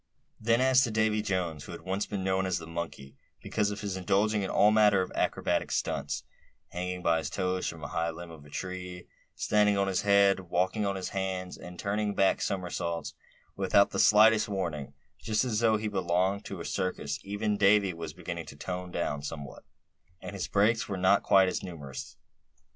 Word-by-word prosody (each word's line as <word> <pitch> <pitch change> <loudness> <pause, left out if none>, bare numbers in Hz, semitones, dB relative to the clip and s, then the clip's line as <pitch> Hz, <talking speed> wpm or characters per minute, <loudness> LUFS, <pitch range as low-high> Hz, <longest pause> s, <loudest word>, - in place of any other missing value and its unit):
Then 115 +2 +2
as 130 0 +5
to 130 - +1
Davy 110 -1 +1
Jones, 90 -7 -2
who - - -8
had - - -8
once 95 +2 -2
been 100 -3 -3
known 95 0 +1
as 90 - 0
the - - -7
"Monkey," 80 -5 -6 0.2
because 105 -2 -1
of 105 0 -5
his 100 -2 -3
indulging 100 +3 +1
in 95 - -2
all 105 - +5
manner 105 -3 +5
of 95 - -4
acrobatic - - 0
stunts, 70 0 -2 0.5
hanging 90 0 -4
by 85 -1 +3
his - - -4
toes 95 -1 -1
from 80 -1 -6
a - - -3
high 85 0 -1
limb 85 +1 -8
of 80 -3 -12
a 75 - -15
tree; 90 +2 -6 0.3
standing 105 -1 +2
on 100 0 +1
his 95 -2 0
head; 100 -1 +4
walking 95 +4 0
on 100 - -1
his 95 - -4
hands; 95 -1 -3
and 90 0 -10
turning 105 +1 -1
back 95 - +3
somersaults 85 -3 -3 0.4
without 100 - +3
the - - -2
slightest 110 +1 +6
warning, 80 -8 -3 0.3
just 110 +9 0
as 110 -4 0
though 110 -2 +3
he 105 0 -3
belonged 95 0 0
to 95 - -6
a 85 - -6
circus—even 100 +5 -2
Davy 100 -1 +4
was 80 -1 -6
beginning 85 -1 -6
to - - -10
tone 90 +4 -5
down 80 -4 -2
somewhat, 70 -1 -7 0.6
and - - -8
his 100 - -3
breaks 110 +3 +2
were 100 - -2
not 95 +2 +4
quite 95 -1 +4
so - - -3
numerous. 75 -7 -8
95 Hz, 195 wpm, -29 LUFS, 85-105 Hz, 0.6 s, slightest